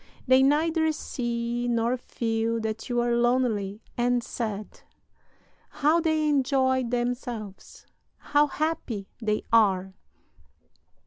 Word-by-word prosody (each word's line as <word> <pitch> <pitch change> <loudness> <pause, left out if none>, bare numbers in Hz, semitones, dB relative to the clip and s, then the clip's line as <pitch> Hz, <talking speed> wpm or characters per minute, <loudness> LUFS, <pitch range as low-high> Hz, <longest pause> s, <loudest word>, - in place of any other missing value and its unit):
They 260 +1 +6
neither 315 +3 +3
see 240 -4 -3
nor 235 +1 +1
feel 230 -2 -2
that 220 +1 -4
you 240 -1 +1
are 240 0 +1
lonely 235 -4 0
and 245 0 +1
sad. 215 -4 -5 0.9
How 305 +4 +2
they 315 -2 +1
enjoy 260 -2 +2
themselves, 240 -4 -4 0.3
how 295 0 +2
happy 280 -10 -3
they 215 -1 0
are! 190 -4 +3
240 Hz, 105 wpm, -26 LUFS, 225-270 Hz, 0.9 s, They